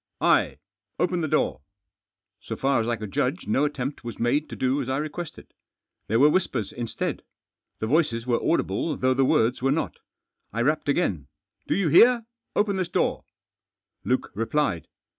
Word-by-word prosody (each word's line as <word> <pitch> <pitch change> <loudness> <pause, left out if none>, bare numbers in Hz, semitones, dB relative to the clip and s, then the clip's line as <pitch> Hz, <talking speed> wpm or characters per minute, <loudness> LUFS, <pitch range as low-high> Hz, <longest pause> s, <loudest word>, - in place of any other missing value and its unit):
" - - -59 0.2
I! - - -6 0.4
Open 180 0 0
the 160 - 0
door." - - 0 0.8
So 115 - -6
far 135 +1 +1
as 110 - -3
I 120 -1 0
eoijld 105 -2 -7
jiidge 135 - -1
no 135 +7 +2
attempt 140 -2 -4
was 120 -1 -6
made 145 +6 +1
to - - -7
dp 130 +2 +1
^s - - -6
I 130 - 0
requested. 155 +2 -6 0.5
There 115 +2 +2
were 145 +3 +6
whispers 125 - 0
instead. 120 -2 -3 0.6
The - - -3
voices 120 -3 +1
were 120 -2 0
audible 165 -2 0
though 130 0 +2
the 135 +1 +2
words 120 0 +2
were 135 - +2
not. 160 - -2 0.5
I 115 +3 -1
rapped 150 +2 0
again. 95 - 0 0.4
(i - - -26
Po - - +3
you 185 -4 +1
hear? 235 - +6 0.3
open 205 -2 +1
this 185 -2 -1
door! - - 0 0.4
" - - -52
J^uke - - 0
replied. 115 - -1
135 Hz, 180 wpm, -25 LUFS, 115-160 Hz, 0.8 s, were